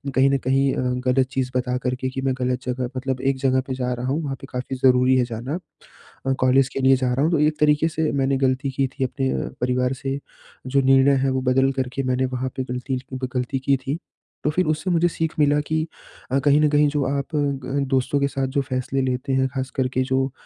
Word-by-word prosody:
कहीं 135 +1 +5
न 140 - +3
कहीं 135 +1 +2
अ, - - -1 0.3
गलत 130 0 +3
चीज़ 130 -1 -1
बता 125 0 -1
करके 130 0 -1
कि 135 +1 -4
मैं 135 -1 +1
गलत 125 0 -1
जगह 125 0 -2
मतलब 130 0 -2
एक 135 0 +1
जगह 130 -1 +2
पे 130 - -2
जा 125 -1 -1
रहा 125 +1 -4
हूँ, 145 +5 0
वहाँ 140 -2 -3
पे - - -9
काफ़ी 125 +1 -4
ज़रूरी 130 0 +4
है 125 - +3
जाना। 120 +8 -4 0.7
अ, 135 - +3
कॉलेज 130 +1 +4
के - - -2
लिए 135 0 +5
जा 125 -1 0
रहा 135 +3 +1
हूँ, 160 - +2
तो 165 - +2
एक 150 0 +2
तरीके 150 +1 +3
से 160 -1 -1
मैंने 135 -1 +1
गलती 130 +1 0
की 135 0 0
थी 130 +1 -4
अपने 130 +1 -2
अ, - - -2
परिवार 125 +1 +1
से 135 +1 -2 0.5
जो 140 +1 +2
निर्णय 135 +1 +5
है 135 - +2
वो 130 - 0
बदल 135 +1 +3
करके 130 +2 -3
मैंने 130 +1 +1
वहाँ 130 +1 -2
पे - - +1
गलती 125 +1 -2
ज 125 - -8
वो 130 0 -3
गलती 125 +1 -1
की 135 +1 +2
थी, 135 +4 -3 0.5
तो 150 - +3
फिर 185 +4 +1
उससे 155 +4 -1
मुझे 170 0 +3
सीख 160 -1 -2
मिला 145 0 +4
कि 160 +1 0 0.4
अ, 135 - +3
कहीं 145 +2 +4
न 150 - +4
कहीं 145 0 +4
जो 145 -1 0
आप 140 0 -1
ग 140 -1 -1
दोस्तों 130 +2 +1
के 140 - +2
साथ 135 -1 -2
जो 140 +2 0
फैसले 130 0 -2
लेते 130 +1 -1
हैं, 130 0 +2
ख़ास 130 -1 -4
करके 130 -1 0
जो 130 0 0
135 Hz, 245 wpm, -23 LUFS, 130-140 Hz, 0.7 s, कहीं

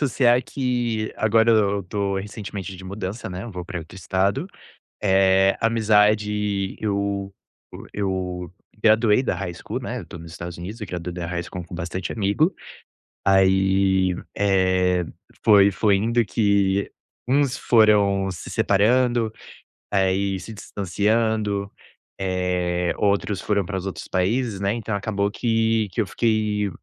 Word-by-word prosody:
associar 125 -3 +3
é - - 0
que 120 -5 -2
agora 110 +1 +3
eu 100 -3 +2
tô 100 +1 -2
recentemente 100 -1 -6
de 95 - -11
mudança, 100 +3 -5
né. 90 +1 -6
Eu 120 - -7
vou 90 -3 -6
pra 90 - -5
outro 80 -1 -11
estado, 95 - 0 0.6
eh, 95 0 +4
amizade, 105 -3 +2
eu 100 -1 -2 0.6
eu 95 -3 -3 0.3
graduei 110 +2 +4
da 105 - -1
high 90 -1 -4
school, - - -5
né. - - -4
Eu - - -8
estou 85 - -10
nos 85 0 -10
Estados 85 0 -7
Unidos, 100 +7 -7
graduei 90 -3 -5
da 90 -1 -4
high 85 0 -2
school 90 +1 -7
com 85 +1 -9
bastante 90 +1 -4
amigo, 110 - +1 0.7
aí, 95 -1 +3 0.2
eh, 95 -3 +2 0.4
foi 100 -2 +6
foi 100 +1 +2
indo 115 +3 +1
que 100 -2 +1 0.4
uns 135 0 +2
foram 100 -4 +3
se 90 - -8
separando. 115 +2 +2 0.6
Aí 95 0 +1
se 110 - -9
distanciando, 105 +1 -1 0.5
eh, 90 -2 -1
outros 100 -1 +1
foram 100 -2 0
para 95 +2 -4
os 95 - -5
outros 95 - -5
países, 105 +3 0
né. 100 +1 0
Então 115 -2 -4
acabou 100 0 -1
que 115 -1 +1
que - - +1
eu 105 - 0
fiquei 105 -3 0
100 Hz, 140 wpm, -23 LUFS, 95-110 Hz, 0.7 s, foi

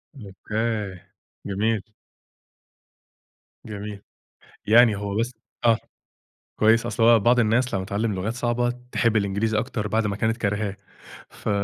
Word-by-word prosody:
أوكي، 105 -3 -4 0.5
جميل. 105 +2 0 1.8
جميل. 105 -1 -7 0.7
يعني 115 -1 +6
هو 100 0 -4
بس 115 +3 0 0.3
آه، 115 -1 +5 0.8
كويّس، 115 +2 +4
أصل 115 -1 -1
هو 115 0 +7
بعض 120 +4 +4
الناس 120 +3 +2
لمّا 95 -1 -1
تتعلم 105 +2 -1
لغات 95 +4 -2
صعبة، 120 0 0 0.2
تحب 115 -2 +2
الإنجليزي 105 +2 0
أكتر 115 -3 -3
بعد 110 0 +1
ما 100 - -2
كانت 110 +2 0
كارهاه، 105 -2 -1 0.5
ف - - -6
110 Hz, 125 wpm, -24 LUFS, 100-115 Hz, 1.8 s, هو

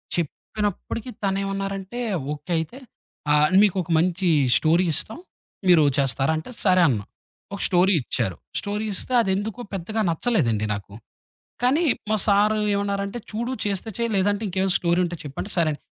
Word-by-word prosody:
చెప్పినప్పటికి 205 - -3
తనేమన్నారంటే, 195 +2 -2 0.3
"okay 150 +4 -9
అయితే. 160 +10 -4 0.5
ఆ! - - +5 0.3
మీకొక 185 -4 +1
మంచి 180 +2 +1 0.3
స్టోరీ 165 +3 +3
ఇస్తాం. 305 - -1 0.5
మీరు 175 -4 +6
చేస్తారా?" 135 +1 +2
అంటే 160 +10 -7
సరే 185 -2 +4
అన్నా. 110 -7 0 0.5
ఒక - - -8
స్టోరీ 185 +2 +3
ఇచ్చారు. 95 -6 -2 0.2
స్టోరీ 205 +2 -3
ఇస్తే 255 - -1
అదెందుకో 205 +3 -2
పెద్దగా 195 +4 -2
నచ్చలేదండి 155 - +1
నాకు. 100 -1 -8 0.7
కానీ, 285 +7 +3 0.3
మా 215 - +3
సారు 210 +1 +3 0.2
ఏవన్నారంటే, 200 +2 -2
"చూడు, 235 +4 -2
చేస్తే 200 +1 -1
చేయి 235 0 0
లేదంటే 205 +2 +1
ఇంకేవైనా 190 0 +1
స్టోరీ 170 0 +1
ఉంటే 175 0 -4
చెప్పు." 140 -2 -9
అంటే, 205 - -8
సరే 170 -2 +3
అని, 145 - -7
190 Hz, 145 wpm, -23 LUFS, 170-205 Hz, 0.7 s, మీరు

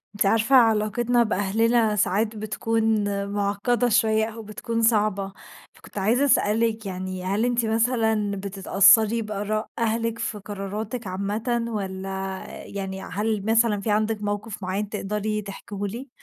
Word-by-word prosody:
أنتِ 205 - +1
عارفة 225 +6 +3
علاقتنا 235 +1 +3
بأهلنا 220 +2 +1
ساعات 210 +2 +1
بتكون 220 0 0 0.2
معقدة 205 +4 0
شويّة 220 -1 +3
أو 225 0 -7
بتكون 230 +2 -3
صعبة، 210 -4 +1 0.4
فكنت - - -15
عايزة 230 +8 +2
أسألِك 225 -3 +2
يعني، 185 -1 -5
هل 200 +5 0
أنتِ 245 -1 +1
مثلًا 220 -2 +1
بتتأثري 200 +3 +4
بآراء 215 0 -3
أهلِك 230 0 -1
في 225 -2 -3
قراراتِك 205 +3 -5
عامةَ؟ 215 +6 -2
والّا 195 -4 -4 0.6
يعني 190 -1 -5
هل 210 +1 -2
مثلًا 220 -2 +3
في 210 - -1
عندِك 215 0 0
موقف 205 0 -4
معيّن 195 +3 -2
تقدري 210 +1 -2
تحكيه 200 0 -8
لي؟ 235 +7 -6
215 Hz, 130 wpm, -24 LUFS, 200-225 Hz, 0.6 s, بتتأثري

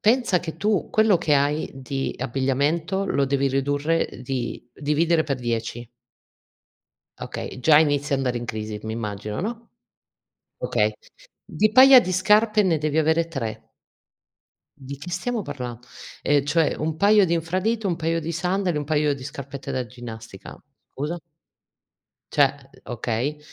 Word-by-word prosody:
pensa 220 -5 +3
che 160 -2 -6
tu 205 +2 0
quello 215 -5 +3
che 150 -3 +2
hai 145 +2 +1
di 135 0 -4
abbigliamento, 145 +9 0
lo 140 -7 +1
devi 140 0 +1
ridurre, 145 +4 0
ehm, 125 - -11
di 125 -2 -4
dividere 155 +4 +1
per 140 -4 -2
10. 120 0 -3 1.3
Okay, 130 - -6
già 150 +3 +6
inizi 145 -1 +1
a - - +5
andare 125 -2 -1
in 120 - -5
crisi, 110 -1 -5
mi 110 0 -4
immagino, 105 -2 -4
no, 230 +4 -5 0.8
okay, - - +1 0.5
di 215 - +1
paia 260 +3 +9
di 185 -4 -2
scarpe 210 +3 +4
ne 170 -4 +2
devi 155 +1 -1
avere 160 +1 +2
3. 120 -9 -5 1.1
Di 135 +1 -7
che 175 +5 -9
stiamo 220 +6 -2
parlando, 125 - -6 0.4
ehm 145 -1 +2
cioè, 160 +1 +2
un 155 0 -2
paio 205 +1 +5
di 170 - 0
infradito, 190 +6 -1
un 175 - 0
paio 165 0 -1
di 165 +1 -4
sandali, 180 0 -1
un 145 - -2
paio 150 -1 +1
di 130 - -10
scarpette 140 0 -7
da 130 -1 -1
ginnastica. 115 -4 -10 0.4
Scusa? 150 +5 -3 1.1
Cioè - - +1
okay, 120 +5 -3
150 Hz, 150 wpm, -24 LUFS, 130-175 Hz, 1.3 s, paia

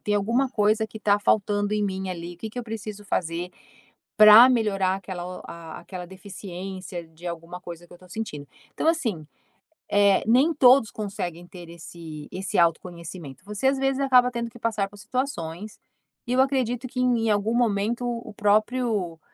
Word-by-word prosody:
tem 210 - -1
alguma 230 +7 +1
coisa 215 -1 +1
que 220 - -12
está 205 -2 +2
faltando 205 0 +1
em 210 -1 +1
mim 190 -1 -3
ali, 175 -1 -6
que 220 - -5
que 225 - -8
eu 245 - -2
preciso 215 -2 -7
fazer 175 -2 -2 0.7
para 215 +3 +10
melhorar 200 -6 +1
aquela 185 -2 -6
o 180 0 -7
a 165 -1 -9
aquela 180 -2 -8
deficiência 185 -1 -8
de 160 +2 -15
alguma 170 +1 -6
coisa 175 -1 -10
que - - -32
eu - - -11
estou 180 +1 -18
sentindo". 160 -9 -6 0.3
Então, - - -2
assim, 225 - 0 0.6
eh, 200 -1 +4
nem 265 +8 +4
todos 255 -5 +6
conseguem 195 -5 -5
ter 175 -2 -11
esse 165 -2 -10
esse 190 +1 -3
autoconhecimento. 170 -3 -2
Você, 210 +5 -1
às 270 +1 +2
vezes, 270 0 0
acaba 250 -2 +4
tendo 235 -1 -3
que 230 - -15
passar 215 -4 -1
por 205 - -15
situações, 205 - -4 0.5
e 245 - -1
eu 255 - +4
acredito 255 -2 0
que 250 - -6
em 240 -3 +2
algum 210 +2 +1
momento 235 +1 +1
o 235 -2 -4
próprio, 210 -4 +1
205 Hz, 175 wpm, -25 LUFS, 175-235 Hz, 0.7 s, para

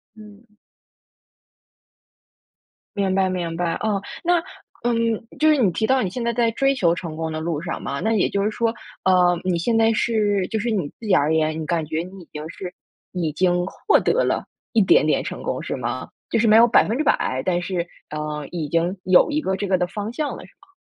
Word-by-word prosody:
嗯。 215 0 -16 2.4
明 195 -2 +1
白 190 -1 +2
明 170 -3 -3
白， 170 -1 -1
哦， 210 -2 -1 0.2
那， 350 0 +3 0.5
嗯， 230 -1 0
就 310 +2 +4
是 305 - +5
你 230 -9 +3
提 220 +6 0
到 260 +1 +3
你 185 - -2
现 245 - -4
在 235 - +1
在 230 0 +2
追 275 +4 +1
求 170 -10 +2
成 170 -3 -6
功 160 0 -3
的 155 - -3
路 160 -2 -2
上 165 -1 -4
嘛， 140 - -3
那 220 - 0
也 215 - +2
就 200 0 -1
是 210 - +1
说， 230 +1 -1 0.3
呃， 180 -2 +4
你 180 -2 +1
现 225 +7 +1
在 225 0 +4
是 210 -4 +1
就 220 - -1
是 235 +3 -1
你 190 -9 -1
自 225 - -12
己 205 - +3
而 150 +3 +3
言， 155 0 +1
你 - - -3
感 165 0 0
觉 160 +1 -2
你 185 +2 -11
已 165 - -18
经 150 0 -6
是 180 0 -7 0.4
已 170 -4 -2
经 180 +2 +1
获 - - +2
得 - - +2
了 - - 0 0.3
一 225 - +4
点 190 - +4
点 - - +1
成 - - -6
功 - - -3
是 - - -4
吗？ - - -4 0.2
就 - - +2
是 225 - +3
没 215 0 +6
有 230 +1 +8
100%， 225 - +2
但 175 -1 +1
是， 175 -2 -2 0.2
呃， 150 -1 -4
已 165 -4 -4
经 170 +4 0
有 185 - +5
一 300 +1 0
个 190 -10 -1
这 200 - -3
个 185 - +3
的 180 - +1
方 205 +4 -5
向 290 +3 -2
了， - - -10
是 - - -22
吗？ 385 - -24
190 Hz, 235 characters per minute, -22 LUFS, 170-225 Hz, 2.4 s, 有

